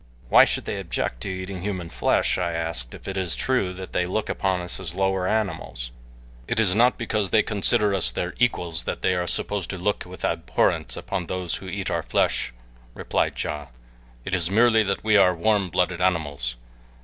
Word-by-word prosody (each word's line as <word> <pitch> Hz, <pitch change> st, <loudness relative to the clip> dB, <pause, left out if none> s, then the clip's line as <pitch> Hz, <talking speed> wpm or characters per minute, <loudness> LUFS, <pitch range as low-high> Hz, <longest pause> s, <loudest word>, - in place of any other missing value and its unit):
"Why -, -, +8 dB
should -, -, -1 dB
they -, -, -3 dB
object -, -, -3 dB
to -, -, -3 dB
eating 95 Hz, 0 st, -5 dB
human 95 Hz, -4 st, -4 dB
flesh," -, -, +2 dB
I 85 Hz, -2 st, -1 dB
asked, 80 Hz, -8 st, -3 dB
"if -, -, -12 dB
it 95 Hz, 0 st, -3 dB
is 90 Hz, -3 st, -1 dB
true 130 Hz, -8 st, +1 dB
that 95 Hz, 0 st, -8 dB
they 90 Hz, -1 st, +1 dB
look 105 Hz, +4 st, -2 dB
upon 95 Hz, -1 st, 0 dB
us 90 Hz, +1 st, -3 dB
as 90 Hz, -3 st, -6 dB
lower 95 Hz, -1 st, +1 dB
animals?" 95 Hz, -, -2 dB, 0.6 s
"It 120 Hz, -, 0 dB
is 100 Hz, -5 st, +3 dB
not 120 Hz, +4 st, +4 dB
because 105 Hz, -4 st, -1 dB
they 110 Hz, +1 st, +4 dB
consider 105 Hz, 0 st, +2 dB
us 90 Hz, -10 st, +1 dB
their 85 Hz, +9 st, -3 dB
equals 90 Hz, -10 st, 0 dB
that -, -, -4 dB
they 95 Hz, -, +3 dB
are 90 Hz, -1 st, -1 dB
supposed 100 Hz, -1 st, -2 dB
to 95 Hz, -, -4 dB
look 100 Hz, +3 st, 0 dB
with 90 Hz, -1 st, -6 dB
abhorrence 85 Hz, -1 st, 0 dB
upon 95 Hz, -4 st, -3 dB
those 90 Hz, -1 st, -2 dB
who 95 Hz, -, -10 dB
eat 100 Hz, 0 st, -3 dB
our -, -, 0 dB
flesh," 65 Hz, -, +1 dB, 0.4 s
replied -, -, -1 dB
Ja; 75 Hz, -2 st, -4 dB, 0.6 s
"it 95 Hz, -, -4 dB
is 85 Hz, -3 st, +2 dB
merely 110 Hz, +2 st, +5 dB
that 100 Hz, -2 st, -1 dB
we 110 Hz, -1 st, +5 dB
are 90 Hz, -2 st, +5 dB
warm 100 Hz, +1 st, +2 dB
blooded 90 Hz, +1 st, 0 dB
animals. 75 Hz, -9 st, 0 dB
95 Hz, 195 wpm, -24 LUFS, 85-100 Hz, 0.6 s, Why